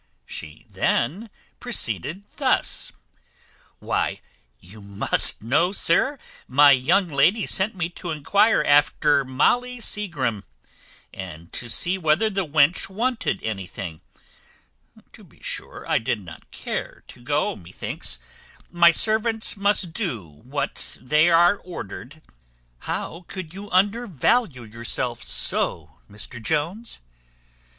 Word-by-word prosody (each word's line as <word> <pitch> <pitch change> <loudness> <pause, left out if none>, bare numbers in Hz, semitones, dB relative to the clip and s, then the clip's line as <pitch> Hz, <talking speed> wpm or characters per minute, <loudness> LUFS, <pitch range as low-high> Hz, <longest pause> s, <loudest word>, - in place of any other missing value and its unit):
She 80 0 -9
then 180 - -1 0.3
proceeded 155 - 0
thus: - - +1 0.9
"Why, - - -1 0.4
you 100 +4 -14
must 100 +1 +1
know, 150 +10 +2
sir, 235 - +2 0.3
my 145 +2 +6
young 165 +9 +3
lady 170 +9 +3
sent 195 +3 +2
me 175 -2 -1
to 175 0 -8
enquire 200 +8 +3
after 145 0 +4
Molly 245 - +1
Seagrim, 140 - -2 0.7
and 85 -3 -9
to 120 - -6
see 180 +10 +2
whether 165 +7 +2
the 195 -3 -1
wench 150 +5 +3
wanted 225 -1 -2
anything; 95 -5 -5 1.1
to - - -15
be - - -21
sure, - - -6
I - - +2
did 110 0 -1
not 85 -4 -13
care - - -6
to - - -14
go, - - 0
methinks; 85 -6 -4 0.5
but 170 -1 +5
servants 220 0 +3
must 200 -4 +1
do 150 - -3
what 75 -1 -6
they 150 +7 +3
are 175 +4 +5
ordered. 155 - -9 0.6
How 170 - -5
could 185 -4 -7
you 200 +2 -9
undervalue 200 - +1
yourself 115 +2 -2
so, - - 0
Mr 105 +3 -8
Jones? 165 - -2
160 Hz, 115 wpm, -23 LUFS, 120-200 Hz, 1.1 s, my